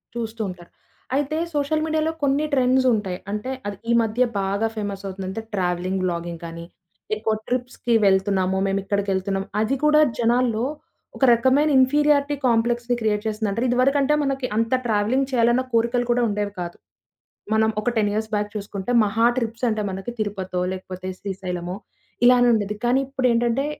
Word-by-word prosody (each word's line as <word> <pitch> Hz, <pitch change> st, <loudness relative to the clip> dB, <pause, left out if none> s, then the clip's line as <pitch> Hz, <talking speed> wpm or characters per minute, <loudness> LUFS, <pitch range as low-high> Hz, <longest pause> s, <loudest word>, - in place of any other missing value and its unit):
చూస్తూ 230 Hz, -1 st, -4 dB
ఉంటారు. 175 Hz, -1 st, -11 dB, 0.4 s
అయితే 290 Hz, +2 st, 0 dB, 0.2 s
సోషల్ 300 Hz, +2 st, 0 dB
మీడియాలో 315 Hz, 0 st, 0 dB
కొన్ని 280 Hz, +2 st, +2 dB
ట్రెండ్స్ 260 Hz, -1 st, +3 dB
ఉంటాయి. 195 Hz, -4 st, -2 dB
అంటే 210 Hz, +5 st, -3 dB, 0.2 s
అది 205 Hz, -1 st, -5 dB
ఈ -, -, +3 dB
మధ్య 225 Hz, +3 st, +1 dB, 0.2 s
బాగా 200 Hz, +3 st, 0 dB
ఫేమస్ 200 Hz, -2 st, -4 dB
అవుతుందంటే, 190 Hz, +2 st, -5 dB
ట్రావెలింగ్ 185 Hz, 0 st, -1 dB
వ్లాగింగ్ 170 Hz, -1 st, -3 dB
కానీ. 170 Hz, 0 st, -7 dB, 0.5 s
ఎక్కువ 220 Hz, +1 st, -1 dB
ట్రిప్స్‌కి 250 Hz, -1 st, -2 dB
వెళ్తున్నాము. 190 Hz, -1 st, +2 dB
మేమేక్కడికెళ్తున్నాం. 195 Hz, 0 st, -1 dB, 0.2 s
అది 220 Hz, +5 st, +1 dB
కూడా 300 Hz, 0 st, +5 dB, 0.2 s
జనాల్లో 235 Hz, -1 st, +2 dB, 0.5 s
ఒక -, -, -3 dB
రకమైన 265 Hz, +6 st, +3 dB
ఇన్ఫీరియారిటీ 290 Hz, +2 st, +3 dB
కాంప్లెక్స్‌ని 240 Hz, +1 st, +1 dB
క్రియేట్ 210 Hz, -1 st, 0 dB
చేసింది 215 Hz, 0 st, -1 dB
అంటే, 230 Hz, +4 st, -1 dB
ఇదివరకంటే 275 Hz, +3 st, +3 dB
మనకి 270 Hz, -2 st, -1 dB
అంత 230 Hz, 0 st, 0 dB, 0.2 s
ట్రావెలింగ్ 230 Hz, +5 st, +1 dB
చేయాలన్న 240 Hz, 0 st, +3 dB
కోరికలు 235 Hz, +2 st, +2 dB
కూడా 240 Hz, 0 st, +2 dB
ఉండేవి 205 Hz, -1 st, -2 dB
కాదు. 175 Hz, 0 st, -6 dB, 0.8 s
మనం 220 Hz, 0 st, +3 dB
ఒక 245 Hz, -, 0 dB
10 210 Hz, -2 st, +2 dB
ఇయర్స్ 220 Hz, +1 st, -2 dB
బ్యాక్ 210 Hz, 0 st, -2 dB
చూసుకుంటే, 200 Hz, +1 st, -4 dB
మహా 220 Hz, +3 st, +1 dB
ట్రిప్స్ 230 Hz, 0 st, -2 dB
అంటే 215 Hz, -1 st, -1 dB
మనకి 195 Hz, +5 st, -5 dB
తిరుపతో, 190 Hz, -4 st, -2 dB
లేకపోతే 185 Hz, 0 st, -7 dB
శ్రీశైలమో 180 Hz, -2 st, -4 dB, 0.5 s
ఇలానుండేది. 240 Hz, -4 st, +4 dB
కానీ 245 Hz, +2 st, +3 dB
ఇప్పుడేంటంటే, 250 Hz, -1 st, +1 dB
225 Hz, 145 wpm, -23 LUFS, 195-250 Hz, 0.8 s, కూడా